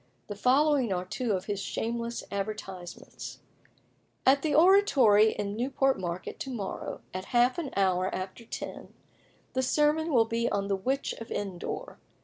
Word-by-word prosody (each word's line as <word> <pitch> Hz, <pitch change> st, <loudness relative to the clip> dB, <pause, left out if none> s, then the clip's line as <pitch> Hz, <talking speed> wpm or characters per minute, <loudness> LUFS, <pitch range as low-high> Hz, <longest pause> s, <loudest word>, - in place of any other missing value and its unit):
The 205 Hz, -, -6 dB
following 265 Hz, +2 st, +3 dB
are 180 Hz, -1 st, -1 dB
two 225 Hz, +4 st, -2 dB
of 185 Hz, 0 st, -2 dB
his 205 Hz, -2 st, -2 dB
shameless 235 Hz, +3 st, -3 dB
advertisements: 195 Hz, -3 st, -6 dB, 0.9 s
"At 275 Hz, +1 st, +5 dB
the 300 Hz, -3 st, 0 dB
Oratory 280 Hz, -, +6 dB
in 205 Hz, 0 st, -3 dB
Newport 265 Hz, +1 st, +1 dB
Market, 180 Hz, 0 st, -5 dB
to 270 Hz, -, -4 dB
morrow, 220 Hz, -7 st, -5 dB
at 185 Hz, +1 st, -4 dB
half 245 Hz, +6 st, +3 dB
an 305 Hz, -5 st, -3 dB
hour 185 Hz, -1 st, +2 dB
after 190 Hz, +5 st, -5 dB
ten, -, -, -7 dB, 0.6 s
the 260 Hz, -, +1 dB
sermon 300 Hz, +4 st, +2 dB
will 235 Hz, -5 st, +5 dB
be 230 Hz, +1 st, 0 dB
on 200 Hz, 0 st, -1 dB
the 200 Hz, -, +2 dB
Witch 265 Hz, +8 st, -1 dB
of 230 Hz, -, -8 dB
Endor. 195 Hz, -4 st, -4 dB
230 Hz, 150 wpm, -29 LUFS, 195-270 Hz, 0.9 s, Oratory